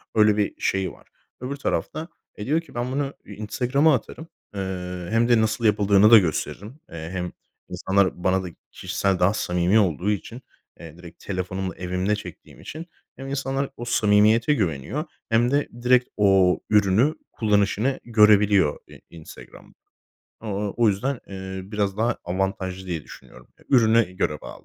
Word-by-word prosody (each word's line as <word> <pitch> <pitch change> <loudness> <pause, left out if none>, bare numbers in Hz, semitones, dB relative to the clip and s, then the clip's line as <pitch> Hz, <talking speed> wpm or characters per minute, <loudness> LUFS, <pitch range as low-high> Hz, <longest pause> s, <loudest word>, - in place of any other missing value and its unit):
Öyle 105 -1 +4
bir 105 - -2
şeyi 95 -2 0
var. - - -19 0.3
Öbür 130 +3 -4
tarafta, 155 +3 -3 0.3
e, 105 - -7
diyor 155 +5 +1
ki, 165 - -18
"Ben 120 +1 -2
bunu 140 +1 -2
I - - -10
Instagram'a 130 +8 +1
atarım, 155 +6 -7 0.3
eee, 90 -2 -5
hem 115 +1 +2
de 120 -2 +5
nasıl 110 +1 -1
yapıldığını 105 0 +4
da 115 - +11
gösteririm. 100 - -2
Eee, 80 -1 -7
hem 90 -1 -4 0.4
insanlar 95 0 0
bana 95 0 +2
da - - -5 0.2
kişisel, 95 -2 -1
daha 95 +3 +3
samimi 90 +1 +1
olduğu 95 0 +1
için, 115 +5 -5 0.4
eee, 80 -1 -11
direkt 85 -1 -14
telefonumla 95 0 -4
evimde 90 +3 -1
çektiğim 90 -5 -11
için, 160 +2 -8 0.3
hem 135 - -9
insanlar 135 0 -2
o 120 - -6
samimiyete 110 +3 +3
güveniyor 100 - -2 0.2
hem 120 +2 +2
de 145 +1 +1 0.2
direkt 125 0 +4
o 95 -3 +4
ürünü 105 +8 +3 0.2
kullanışını 105 +4 +1
görebiliyor 105 -7 +4
I - - -15
Instagram'da." 80 -2 -13 0.7
O 110 - -8
o 100 0 -3
o 120 -2 +4
yüzden, 120 +6 -1
eee, 95 -1 -6
biraz 100 -2 -1
daha 115 +2 0
avantajlı 95 +1 -3
diye 85 -4 -4
düşünüyorum. - - -15
Eee, - - -22
ürünü 115 -6 +4
göre 75 -4 -1
bağlı. - - -11
105 Hz, 160 wpm, -23 LUFS, 95-120 Hz, 0.7 s, da